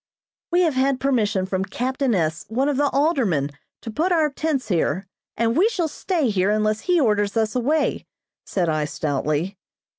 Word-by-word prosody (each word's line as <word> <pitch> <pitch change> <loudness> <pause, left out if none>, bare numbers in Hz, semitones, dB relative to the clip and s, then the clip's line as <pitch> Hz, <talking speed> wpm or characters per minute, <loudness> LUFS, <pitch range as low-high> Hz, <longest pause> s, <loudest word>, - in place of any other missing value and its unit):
"We 350 +1 +4
have 330 -4 +2
had 260 0 +1
permission 215 -8 +1
from 190 0 -1
captain 250 +4 -1
S., 165 -2 -1
one 255 +5 0
of 290 -2 0
the 290 0 +2
aldermen, 250 - +1 0.3
to 225 - -5
put 325 +12 0
our 315 -4 +3
tents 275 -5 -2
here, 180 0 0 0.3
and 230 +1 +1
we 400 +6 +4
shall 350 -8 -1
stay 315 - -1
unless 215 +2 +1
he 355 +7 +2
orders 210 -5 +1
us 220 0 0
away," 290 +5 0 0.4
said 180 -3 -1
I 155 -1 0
stoutly. 150 +5 -2
230 Hz, 170 wpm, -22 LUFS, 190-290 Hz, 0.4 s, We